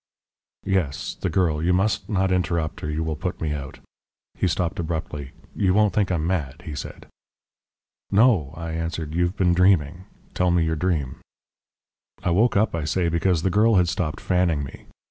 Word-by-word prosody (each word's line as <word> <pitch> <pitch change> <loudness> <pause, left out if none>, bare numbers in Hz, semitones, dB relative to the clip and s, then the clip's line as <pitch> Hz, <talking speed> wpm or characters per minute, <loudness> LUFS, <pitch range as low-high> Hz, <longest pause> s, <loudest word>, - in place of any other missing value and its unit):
"Yes, 95 -8 -1
the 95 - -3
girl. 80 -3 +1
You 90 +3 +2
must 100 +2 0
not 95 -3 +1
interrupt 85 -3 -1
or 75 - -2
you 75 +1 -1
will 80 -1 -2
put 90 +3 -4
me 75 -2 -1
out." 70 -2 -6 0.6
He - - 0
stopped 85 0 -1
abruptly. 80 -4 -4 0.3
"You 95 -2 +2
won't 105 -1 +3
think 100 -3 +1
I'm 80 -3 0
mad?" 75 -6 -2
he 75 - -5
said. 70 - -7 1.0
"No," 100 - +4
I 85 -1 -5
answered; 80 -1 -4
"you've 90 +3 0
been 90 -3 +3
dreaming. 90 -2 +2 0.3
Tell 90 0 +1
me 85 -1 +3
your 80 0 0
dream." 75 -6 -1 1.1
"I 90 - +1
woke 105 +5 +3
up, 110 +2 +2
I 85 -2 -2
say, 85 +3 0
because 85 0 +1
the 95 - +1
girl 110 +3 +4
had 90 -2 +4
stopped 80 -2 -2
fanning 90 -5 +1
me. 65 - -10
85 Hz, 180 wpm, -24 LUFS, 80-95 Hz, 1.1 s, No